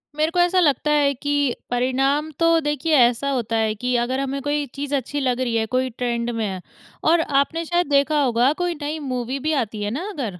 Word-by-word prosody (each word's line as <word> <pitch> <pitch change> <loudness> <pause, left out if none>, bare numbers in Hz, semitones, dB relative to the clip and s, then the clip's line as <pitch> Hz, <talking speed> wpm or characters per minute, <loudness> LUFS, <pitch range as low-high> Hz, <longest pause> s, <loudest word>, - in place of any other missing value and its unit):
मेरे 310 +2 +1
को 355 - 0
ऐसा 355 +1 +3
लगता 300 -2 +2
है 285 -2 +3
कि 285 -1 0
परिणाम 270 +5 +1
तो 330 0 +4
देखिए 295 +1 0
ऐसा 245 +3 +3
होता 235 -3 -2
है 220 -1 +1
कि 250 +3 -2
अगर 255 +3 -1
हमें 275 0 -3
कोई 290 +1 -1
चीज़ 285 +1 -4
अच्छी 280 +2 -2
लग 255 -2 0
रही 240 -2 -1
है, 220 -1 +1
कोई 255 +3 -1
ट्रेंड 235 0 -2
में 225 -2 -2
है 190 -2 -4 0.5
और 335 -1 +4 0.2
आपने 330 +4 -3
शायद 350 -1 0
देखा 285 +1 +3
होगा 245 +2 +3
कोई 350 -1 0
नई 305 +2 -3
मूवी 255 +1 -3
भी 315 - +2
आती 215 -1 -8
है 205 - -2
ना 335 - -4
अगर। 230 - -5
275 Hz, 220 wpm, -22 LUFS, 240-300 Hz, 0.5 s, तो